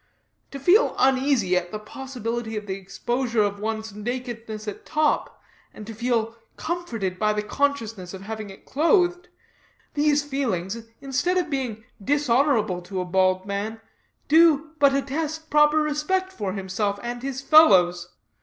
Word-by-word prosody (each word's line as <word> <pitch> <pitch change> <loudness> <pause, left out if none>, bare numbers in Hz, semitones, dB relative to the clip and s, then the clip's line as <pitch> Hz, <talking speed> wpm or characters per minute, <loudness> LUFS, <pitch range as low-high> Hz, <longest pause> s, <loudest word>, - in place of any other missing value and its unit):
To 275 - -7
feel 370 - +4
uneasy 260 -7 +2
at 175 -1 -1
the 215 - -3
possibility 230 -1 -5
of 210 - -5
the 195 - -3
exposure 230 +4 -1
of 205 0 -2
one's 220 0 -4
nakedness 230 -1 -5
at 210 - -6
top, 305 -1 0 0.4
and 210 - -9
to 225 - -7
feel 230 0 -1 0.2
comforted 230 - -3
by 215 -1 +2
the 210 0 -2
consciousness 225 -8 -2
of 190 0 -9
having 215 0 -6
it 195 - -13
clothed 355 +4 +2 0.7
these 295 0 +2
feelings, 230 -7 -3 0.2
instead 275 +7 0
of 345 -4 -1
being 245 -6 -3 0.2
dishonorable 250 -8 +2
to 185 +2 -5
a 180 - -2
bold 185 +1 +2
man, 205 +3 -4 0.5
do, 325 +2 +7
in - - -7
fact, 310 0 -30
but 280 -1 +5
attest 300 +3 -2
a - - -34
proper 300 +1 +5
respect 310 +6 0
for 200 - -3
himself 200 +1 -2
and 240 0 -4
his 265 0 -4
fellows. 180 - +5
235 Hz, 155 wpm, -24 LUFS, 205-290 Hz, 0.7 s, do